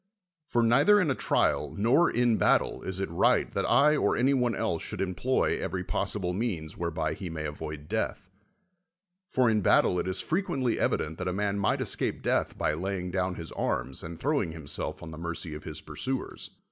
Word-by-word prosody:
For 120 - +2
neither 205 - +5
in 170 -7 +2
a - - +3
trial - - +1
nor 125 +12 +4
in 120 -2 +2
battle - - +2
is 95 0 -4
it 95 - -2
riglit 85 - +2
that - - 0
I 150 +2 +5
or - - +1
any 135 +3 +3
one 125 -4 +1
else 85 -1 -1
should - - -4
employ 95 +8 0
every 90 -1 -3
possible 95 -1 -2
means 90 -7 -2
whereby 80 -2 -2
he 90 +2 -6
may 80 -1 -4
avoid 75 0 -6
death; - - -2 1.0
for 130 -1 +3
in 110 -2 +3
battle 90 -1 +4
it - - -2
is 95 +1 -1
frequently 140 - 0
evident 80 +1 0
that 95 - -3
a 90 - 0
man 100 +1 -1
might 100 - +1
escape - - -2
death - - 0
by - - +1
lay 95 +5 -2
ing 90 0 -5
down 95 0 -1
his 85 -1 -7
arms 65 - -2
and 80 0 -8
throwing 140 - 0
himself 80 -4 -5
on 80 - -8
the 80 - -8
mercy 85 -1 -4
of 75 - -8
his 80 -1 -5
pursuers. 130 - -4
95 Hz, 195 wpm, -28 LUFS, 80-120 Hz, 1.0 s, neither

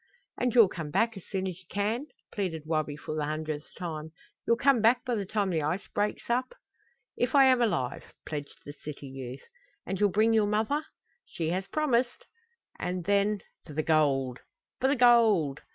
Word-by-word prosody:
"And 250 -1 -1
you'll 230 -4 +8
come 165 -4 -6
back 225 +9 +1
as 195 - -11
soon 190 -2 -2
as 185 -1 -5
you 185 - -21
can?" 220 +8 -1 0.2
pleaded 180 -7 -3
Wabi 155 -2 -1
for 150 - -6
the 155 -1 -1
hundredth 155 0 -4
time. 160 -3 -5 0.4
"You'll 230 - +4
come 265 -2 +4
back 235 +4 +4
by 250 - -1
the 205 -4 -2
time 205 -2 0
the 160 -2 0
ice 160 +7 -2
breaks 205 +1 -2
up?" 250 - -1 0.6
"If 250 +3 0
I 275 - +8
am 255 -2 +5
alive!" 130 - 0 0.2
pledged 145 -2 -6
the 145 - -7
city 145 -1 -9
youth. 130 -1 -8 0.4
"And 190 - -3
you'll 205 - +4
bring 220 +4 +3
your 215 -2 +3
mother?" 220 +9 0 0.4
"She 160 -2 -3
has 185 +3 -2
promised." 255 -5 0 0.5
"And 180 0 -2
then 205 0 +2 0.2
for 150 - -11
the 155 +2 -1
gold!" 135 -5 +2 0.4
"For 265 - +2
the 275 - +3
gold!" 220 - +4
195 Hz, 185 wpm, -29 LUFS, 155-230 Hz, 0.6 s, you'll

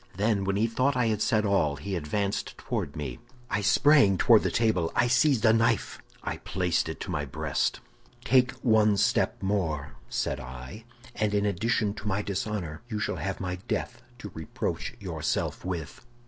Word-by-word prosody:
Then, 100 0 +1
when 100 0 0
he 105 +3 +2
thought 130 +4 +1
I 125 - +2
had 105 -1 -1
said 110 -3 +2
all, 90 -8 +2
he 95 +8 -4
advanced 100 +5 -2
toward - - -3
me; 75 +6 -5 0.3
I 105 - +1
sprang 120 -1 +5
toward 115 +1 +6
the - - 0
table, 110 -8 +1
I - - +4
seized 125 0 +3
a 110 - +6
knife, 115 +1 +1 0.2
I - - -3
placed 90 -3 -1
it 80 - -6
to - - -4
my 80 -4 -1
breast. 65 - -1 0.4
"Take 125 0 +4
one 110 -3 +4
step 100 - +1
more," 80 -8 -1 0.2
said 70 - -1
I, 65 - -9 0.3
"and 105 -1 0
in 100 0 +2
addition 105 +1 0
to 105 0 -7
my 100 +1 0
dishonor, 100 -5 -3
you 110 -3 -3
shall 100 - -2
have 95 +5 -3
my 90 -1 -3
death - - -3 0.2
to - - -8
reproach - - -4
yourself - - -2
with." 90 -2 -5
100 Hz, 175 wpm, -28 LUFS, 90-110 Hz, 0.4 s, toward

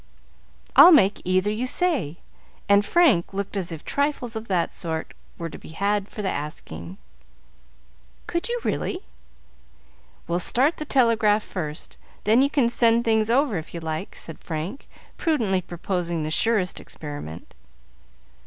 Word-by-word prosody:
"I'll 290 +7 +10
make 205 - +5
either 185 +3 +2
you 235 +4 -2
say;" 255 - 0 0.5
and 200 +1 +5
Frank 215 - +3
looked 200 +1 -3
as 185 -3 -2
if 160 -2 -8
trifles 280 -5 -1
of 220 +1 -5
that 180 -3 0
sort 160 -3 -4 0.2
were 170 - -4
to - - -9
be 160 - -12
had 200 0 0
for 210 - -6
the - - -1
asking. 90 - -6 1.3
"Could 340 +7 -2
you, 485 0 -1
really?" 370 - -2 1.3
"We'll 170 +1 0
start 265 - +2
the 305 - -5
telegraph 225 -6 +3
first, 155 -5 -6 0.3
then 220 +4 +4
you 280 - +3
can 275 -5 +2
send 235 0 +3
things 220 -1 +2
over 245 - +2
if 160 - -10
you - - -3
like," 160 +3 -5
said 165 - -8
Frank, 165 - -5 0.3
prudently 225 - +1
proposing 175 -1 -3
the 155 - -3
surest 205 0 +1
experiment. 145 - -8
200 Hz, 145 wpm, -24 LUFS, 170-245 Hz, 1.3 s, I'll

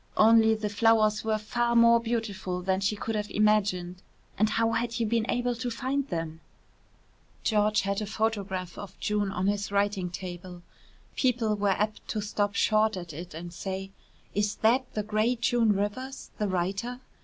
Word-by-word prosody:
Only 220 0 +6
the 215 -1 -3
flowers 215 0 +3
were 220 -1 +1
far 235 +2 -1
more 235 0 +7
beautiful 205 -6 -3
than 190 0 +1
she 200 +2 0
could 225 +2 -4
have 210 -1 -2
imagined 195 -4 +1 0.3
and 215 +2 +2
how 225 +1 +1
had 235 +1 -1
you 230 - +1
been 225 +1 0
able 245 0 +1
to 235 +1 -3
find 265 +4 -2
them? 165 - -4 1.0
George 215 -1 +2
had 200 +2 -1
a 210 - -3
photograph 200 -5 -2
of 200 -2 -9
June 210 -1 0
on 185 0 -2
his 200 0 0
writing 200 -2 0
table. 180 0 -8 0.5
People 235 -4 +1
were 205 -1 +1
apt 210 +2 -1
to 215 - -2
stop 205 -1 -1
short 215 -1 +3
at 175 -3 -7
it 170 +2 -8
and 170 +1 -7
say: 190 +1 -5 0.4
"Is 205 0 0
that 250 +3 +3
the 210 - 0
great 215 +3 0
June 240 -2 +3
Rivers, 210 +7 -3
the 210 - +1
writer?" 195 +7 -2
210 Hz, 170 wpm, -28 LUFS, 195-225 Hz, 1.0 s, more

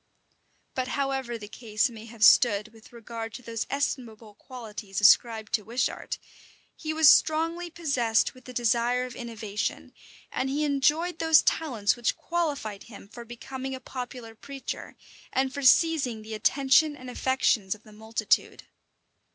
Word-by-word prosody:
[*] - - -43
But 255 -1 -2
however 265 -3 -2
the 210 -2 -9
case 220 +2 -1
may 225 -3 -10
have 225 -1 -5
stood 210 -3 +5
with 225 0 -18
regard 230 -1 -7
to 250 - -9
those 230 -1 -4
estimable 230 -6 -3
qualities 215 -4 -7
ascribed 220 +1 +4
to 220 - +2
Wishart, 235 +4 -2 0.6
he 315 - -4
was 315 -1 +4
strongly 330 +4 +4
possessed 280 -10 +1
with 255 -1 -18
the 255 - -9
desire 240 +1 +1
of 250 -2 -9
innovation; 220 -4 -4 0.4
and 265 +1 -2
he 290 +3 -1
enjoyed 300 +5 +1
those 320 -2 +5
talents 235 -10 +1
which 240 -1 -1
qualified 285 -12 -3
him 205 -3 -12
for 235 +2 -10
becoming 260 +3 -6
a - - -8
popular 245 -3 -7
preacher, 275 +4 -8 0.3
and 265 0 0
for 280 - -4
seizing 265 -5 +3
the 220 +1 -8
attention 275 +6 +3
and 255 - -11
affections 245 -6 +1
of 215 - -20
the 215 - -16
multitude. 220 +2 -1
245 Hz, 150 wpm, -27 LUFS, 220-275 Hz, 0.6 s, stood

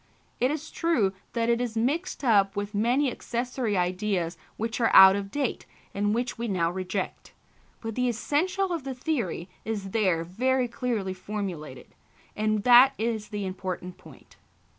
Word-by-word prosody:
It 250 - +3
is 310 +1 -4
true 245 - +1 0.2
that 230 -1 0
it 235 0 +2
is 235 -2 -3
mixed 295 +10 -1
up 200 -5 +3
with 205 +1 -3
many 245 +6 +2
accessory 240 -3 -2
ideas 180 -1 -1 0.2
which 230 +2 -3
are 230 - +4
out 190 0 +10
of 200 -1 -4
date 275 +1 -2 0.3
and 205 +1 0
which 240 0 -2
we 235 - -2
now 170 -5 0
reject; 185 +1 -4 0.5
but 225 -1 -4
the 250 +2 +1
essential 360 - 0
of 330 -5 -3
the 265 -1 -5
theory 245 - -2 0.2
is 200 -3 -4
there 185 -7 +1
very 250 +8 0
clearly 230 -5 -2
formulated, 185 -9 -6 0.4
and 215 -1 0
that 250 +2 +7
is 220 -1 -2
the 205 -2 -4
important 185 -1 -5
point. - - -17
220 Hz, 160 wpm, -27 LUFS, 195-250 Hz, 0.5 s, out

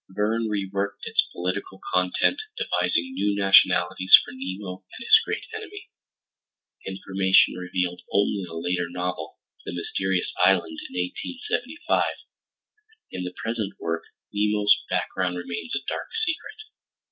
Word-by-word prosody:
Verne 110 +4 0
reworked 100 -1 -2
its - - +3
political 95 +2 -4
content, 90 - +2 0.2
devising 265 -1 0
new 105 - +1
nationalities 95 -1 +6
for - - -9
Nemo 95 -6 -6
and 235 - -8
his 440 - +8
great - - -3
enemy—information 95 - -2
revealed 90 0 -2
only 100 0 +2
in 90 - -6
a 80 - -6
later 90 +1 -1
novel, 90 +1 -4 0.3
The - - -5
Mysterious 95 +2 -1
Island 90 -4 +3
(1875); 250 - -1 1.1
in 90 - -4
the 90 - -5
present 110 -3 -2
work 85 0 -2 0.3
Nemo's 105 0 +4
background 90 -1 -1
remains 90 - -4
a - - -4
dark - - -3 0.2
secret. 340 +6 -4
95 Hz, 120 wpm, -25 LUFS, 90-105 Hz, 1.1 s, his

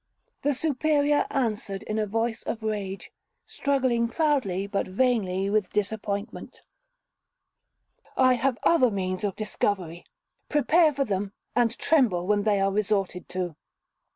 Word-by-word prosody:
The 290 -1 +1
Superior 295 0 +1
answered, 215 -7 -2
in 215 +1 -2
a 215 - 0
voice 225 +2 -1
of 225 -1 -5
rage, 205 -3 -4 0.3
struggling 255 -4 0
proudly, 235 - 0
but 200 0 -2
vainly, 195 -3 +1
with 205 -2 +1
disappointment, 205 0 -4 1.5
'I 255 -1 +5
have 250 0 0
other 295 -7 +5
means 185 -1 -3
of 200 -2 -1
discovery—prepare 215 - 0
for 275 0 +1
them, 200 -1 -2 0.2
and 235 -1 +2
tremble 230 - +2
when 205 +1 +2
they 205 -2 +3
are 195 0 +2
resorted 195 -3 -1
to.' 180 -3 -3
215 Hz, 125 wpm, -26 LUFS, 195-260 Hz, 1.5 s, I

